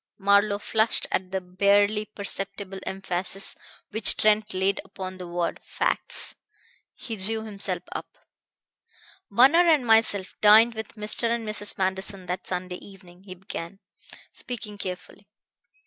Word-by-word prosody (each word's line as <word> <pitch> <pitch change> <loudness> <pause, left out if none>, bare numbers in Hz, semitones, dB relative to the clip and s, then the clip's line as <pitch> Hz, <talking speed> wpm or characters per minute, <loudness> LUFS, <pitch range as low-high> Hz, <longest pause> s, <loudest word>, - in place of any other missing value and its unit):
Marlowe 200 +1 +3
flushed 220 +2 +2
at 185 0 -1
the 190 0 -2
barely 200 +3 +2
perceptible 195 -2 -4
emphasis 190 0 -1 0.4
which 220 -1 +3
Trent 215 0 +2
laid 190 +1 0
upon 185 0 -8
the 180 - -7
word 175 0 -2
"facts." - - -1 0.6
He 225 -3 -7
drew 220 +3 -3
himself 205 -2 -2
up. - - -5 1.2
"Bunner 265 +11 +6
and 305 -6 +4
myself 220 -4 +3
dined 220 +3 +7
with 220 0 -7
Mr. 210 +2 0
and 230 -1 -2
Mrs. 210 -1 +3
Manderson 190 0 -2
that 180 +1 -4
Sunday 180 0 -3
evening," 185 -2 -15
he 185 -2 -9
began, 175 0 -7 0.5
speaking 215 -4 -5
carefully. 185 +2 -7
200 Hz, 130 wpm, -25 LUFS, 185-215 Hz, 1.2 s, dined